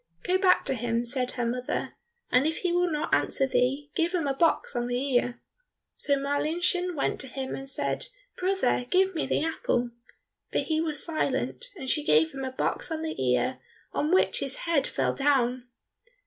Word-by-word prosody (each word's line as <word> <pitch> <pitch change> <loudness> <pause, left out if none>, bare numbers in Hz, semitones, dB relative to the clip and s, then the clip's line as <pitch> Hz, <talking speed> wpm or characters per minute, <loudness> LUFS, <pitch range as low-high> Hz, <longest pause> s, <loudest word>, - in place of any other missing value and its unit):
"Go 370 +1 +2
back 375 -1 +4
to - - +1
him," 235 -1 -1
said 250 +1 0
her 245 -2 -1
mother, 250 +2 -2 0.4
"and 255 +4 +4
if 320 - -2
he 360 - +1
will 355 0 +2
not 300 -2 -2
answer 270 - +2
thee, 270 +3 0
give 345 +1 +1
him 335 -4 0
a 275 - +1
box 320 -1 +1
on 240 0 0
the 245 0 0
ear." 250 -2 0 0.6
So 285 - +1
Marlinchen 330 +6 0
went 280 - -1
to 265 - -4
him 265 0 -5
and 270 0 -6
said, 275 - -1 0.3
"Brother, 365 -10 +1
give 380 +1 +3
me 320 - -1
the - - +1
apple." 245 -6 0 0.6
But - - +1
he 315 -1 0
was 310 -3 -1
silent, 340 +8 -1
and 270 -8 -7
she 300 +3 +1
gave 160 - +4
him 270 - -6
a 260 - -3
box 260 - -1
on 320 -1 -3
the 315 - -3
ear, 130 - +1 0.3
on 300 - 0
which 375 - +3
his 275 -1 -3
head 325 -5 +2
fell - - 0
down. 255 -3 +1
280 Hz, 190 wpm, -27 LUFS, 250-330 Hz, 0.6 s, back